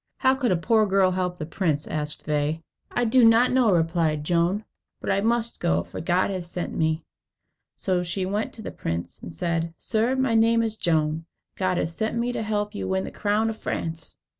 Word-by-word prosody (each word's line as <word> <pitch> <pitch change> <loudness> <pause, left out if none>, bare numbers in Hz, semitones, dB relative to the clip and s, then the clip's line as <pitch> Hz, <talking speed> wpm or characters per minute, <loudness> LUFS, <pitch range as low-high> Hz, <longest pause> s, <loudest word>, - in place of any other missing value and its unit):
"How 260 -1 +4
can 260 -5 0
a 180 - +3
poor 215 +5 +3
girl 190 -1 +3
help 180 -1 -1
the 155 - -4
prince?" 155 -3 -1
asked 150 -1 -3
they. 150 +2 -1 0.3
"I 245 - 0
do 245 +2 +4
not 230 +2 +6
know," 250 -4 +4
replied 165 -3 +1
Joan; 175 +6 +1 0.3
"but - - -2
I 195 - +2
must 235 +1 0
go, 80 +1 +1
for 85 - -7
God 180 +4 +1
has 180 -3 -4
sent 175 0 -4
me." 160 0 0 0.7
So 185 -2 0
she 180 +2 -2
went 205 +3 -2
to 220 - -9
the - - -5
prince, 85 +1 -4
and 85 - -7
said: 165 - -2
"Sir, 230 +3 0
my 260 -3 +1
name 230 +1 +4
is 220 -1 -1
Joan. 160 -4 0 0.3
God 185 -2 0
has 165 0 -1
sent 220 +1 -1
me 240 +1 0
to - - -2
help 210 -1 -1
you 205 - -4
to - - -3
win 190 0 0
the - - -6
crown 215 +2 +1
of 220 - -8
France." 165 -1 -4
185 Hz, 215 wpm, -25 LUFS, 165-220 Hz, 0.7 s, not